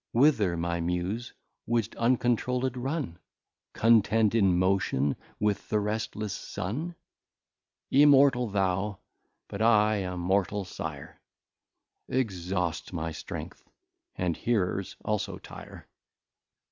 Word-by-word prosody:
Whither 115 - +4
my 85 +1 -1
Muse, 90 +7 -2 0.4
would'st 115 -2 0
uncontrouled 125 +1 +1
run? 130 - -3 0.5
Contend 110 -1 +4
in 95 -6 +4
Motion 90 -7 +1 0.2
with 105 -1 -1
the 105 - +2
restless 105 -1 -3
Sun? 150 - -4 1.0
Immortal 140 -3 +6
thou, 95 0 0 0.5
but 100 - -6
I 110 -1 +4
a 90 -2 -3
mortal 95 +2 0
Sire - - -7 0.9
Exhaust 90 -8 -2
my 80 -1 -3
strength, 80 - -8 0.5
and 90 -3 -1
Hearers 95 -5 -1
also 105 -1 -1
tire. - - -11
105 Hz, 95 wpm, -28 LUFS, 90-120 Hz, 1.0 s, Immortal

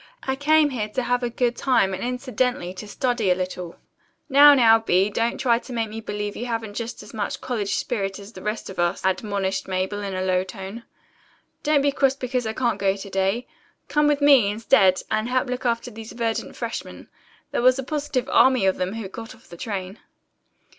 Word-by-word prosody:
I 265 - -1
came 300 +1 +3
here 215 -5 -3
to 255 +4 -2
have 245 +1 0
a 245 - -1
good 240 0 0
time, 215 -8 +2
and 190 - -4
incidentally 250 -6 -1
to 200 +3 -9
study 240 -2 0
a 180 - +4
little." 180 -2 -5 0.5
"Now, 285 +1 +8
now, 225 -3 +6
Bee, 195 -2 +2
don't 230 +3 0
try 235 -3 +2
to 250 - -10
make 225 -2 -1
me 220 +1 -6
believe 210 -1 -4
you 245 - -5
haven't 225 -3 -3
just 230 +2 -5
as - - -13
much 210 -2 -3
college 230 -6 -2
spirit 195 -5 -2
as 200 +2 -12
the 185 - -10
rest 210 +2 -3
of 190 - -9
us," 175 +1 0
admonished 195 0 -1
Mabel 190 +2 -2
in 195 -2 -4
a 185 - -2
low 185 -1 +1
tone. 195 +4 -8 0.8
"Don't 295 -2 +2
be 285 - +3
cross 270 -1 +2
because 250 -3 -2
I 220 - -2
can't 240 0 0
go 195 -1 +2
to 200 0 -8
day. 195 +6 0 0.4
Come 295 0 +3
with 295 -1 +2
me, 275 -8 +6
instead, 205 -3 +3
and 215 +2 0
help 255 +1 +1
look 250 0 -2
after 235 +1 -1
these 220 0 -9
verdant 230 -1 -2
freshmen. - - -6 0.4
There - - 0
was 255 +1 +5
a 265 - -3
positive 285 -2 -2
army 255 -3 +4
of 190 - +2
them 185 +2 -2
who 225 -3 -5
got 225 +5 -9
off 235 - -23
the - - -10
train." 190 +1 -5
225 Hz, 210 wpm, -23 LUFS, 195-255 Hz, 0.8 s, Now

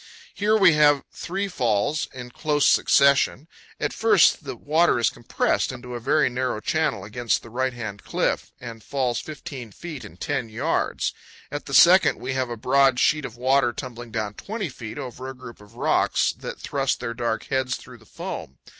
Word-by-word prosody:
Here 210 +1 +2
we 190 -5 +6
have 145 -2 +4
three 195 +3 -3
falls 125 - 0
in 125 -1 -9
close 150 +1 0
succession. 140 +1 +4 0.3
At - - -1
the - - -10
first - - +4
the - - -5
wa$er 160 +4 +2
is 120 - +2
compressed - - -1
into 125 0 -8
a 120 - -4
very 150 +6 +2
narrow 125 -2 -2
channel 155 +6 -1
against 120 -2 -1
the 115 - -12
right 130 +2 0
hand 105 -4 -7
cliff, - - -1
and 115 -3 -9
falls 130 -4 -1
15 140 -7 -8
feet 160 - -8
in - - -12
10 135 -6 -2
yards. 130 +9 -1 0.4
At 145 - -5
the 140 - -1
second 185 +5 +7
we 130 +1 -4
have 130 -1 -1
a 120 - -5
broad 135 +2 +3
sheet 150 -2 +2
of 120 - -8
water 130 0 +3
tumbling 120 -2 -7
down 110 -2 -3
20 205 - -5
feet 110 -4 -8
over 130 +1 -6
a 135 - -8
group 125 -4 -11
of 105 +3 -17
rocks - - +2
that - - -8
thrust 135 -2 -1
their 115 - -4
dark 115 -1 -2
heads 130 -1 0
through 125 -2 -12
the 110 - -20
foam. 65 - -7
130 Hz, 190 wpm, -24 LUFS, 120-145 Hz, 0.4 s, second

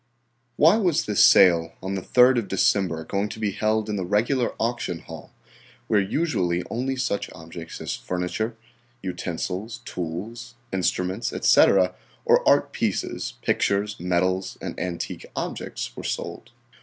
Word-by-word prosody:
Why 165 - +6
was 175 -7 +1
this 105 -2 +3
sale 85 -3 +6
on 95 +1 -3
the 95 - -2
3d 125 +5 +5
of 110 - -5
December 95 -4 +1
going 100 +5 -2
to 110 - -8
be 105 -2 0
held 110 +2 0
in 105 -1 -2
the 95 - -2
regular 115 +7 +1
auction 115 -7 -2
hall, 80 -3 -11 0.6
where 105 - +3
usually 95 - 0
only 130 +3 -1
such 130 -6 -2
objects 80 0 -9
as - - -3
furniture, 90 +6 -3 0.5
utensils, 95 +5 -4
tools, 110 +9 -6 0.2
instruments, 95 +3 -1
etc., 95 -2 +4 0.3
or - - +5
art - - +3
pieces, - - -2
pictures, 100 +1 0
medals, 90 +2 0
and - - -6
antique 90 -2 -4
objects - - -4
were - - -7
sold? - - -4
100 Hz, 140 wpm, -24 LUFS, 90-115 Hz, 0.6 s, Why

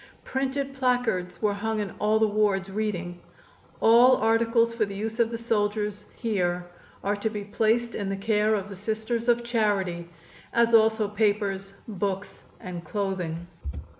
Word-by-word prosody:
Printed 270 +1 -2
placards 245 -9 0
were 210 -1 +3
hung 220 +2 -2
in 205 -3 -3
all 215 +1 +3
the 220 - +4
wards, 205 -2 +1
reading: 185 -4 -3 0.6
"All 240 +3 +7
articles 230 +1 +3
for 230 -1 +1
the 200 -1 -4
use 220 +3 -4
of 230 -1 +3
the 230 - -4
soldiers 210 -2 -1
here 180 -6 -1 0.4
are 200 +1 +1
to 220 +2 -1
be 210 -2 -5
placed 225 +3 +1
in 200 -2 -3
the 195 - -2
care 215 +1 +2
of 200 -1 -3
the 200 - -8
Sisters 220 +4 -2
of 240 0 +3
Charity, 200 -7 0 0.4
as 235 0 +3
also 220 -1 +5
papers, 205 -2 0
books 200 -1 -3 0.2
and 180 -4 -7
clothing." 180 -5 -3
210 Hz, 155 wpm, -26 LUFS, 195-230 Hz, 0.6 s, All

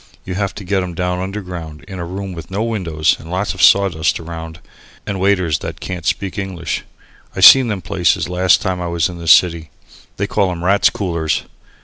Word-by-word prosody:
You 90 - -4
have 100 0 -2
to 100 - -8
get 95 +1 0
'em 90 -2 -5
down 90 +1 -1
underground 90 -5 -6
in 95 -2 -8
a 85 - -4
room 95 +2 -6
with 85 -2 -9
no 100 +3 -2
windows 90 -9 0
and 80 - -12
lots 95 +3 -2
of 95 - -5
sawdust 95 -5 +4
round 80 -1 -8 0.5
and 100 -1 -4
waiters 90 -6 +1
that - - -7
can't 90 -3 -5
speak 100 +1 -2
English. 90 -5 -4 0.5
I - - -3
seen 130 -2 +9
them 105 -4 -3
places 95 -7 +1
last 90 +1 +2
time 95 -2 -2
I 90 - -3
was 85 0 0
in 90 -1 -8
the 85 - -8
city. 85 +1 +4 0.5
They 100 - 0
call 100 -2 0
'em 85 -1 -5
Rats' 100 +1 +4
Coolers. 85 -6 -2
90 Hz, 205 wpm, -18 LUFS, 85-100 Hz, 0.5 s, seen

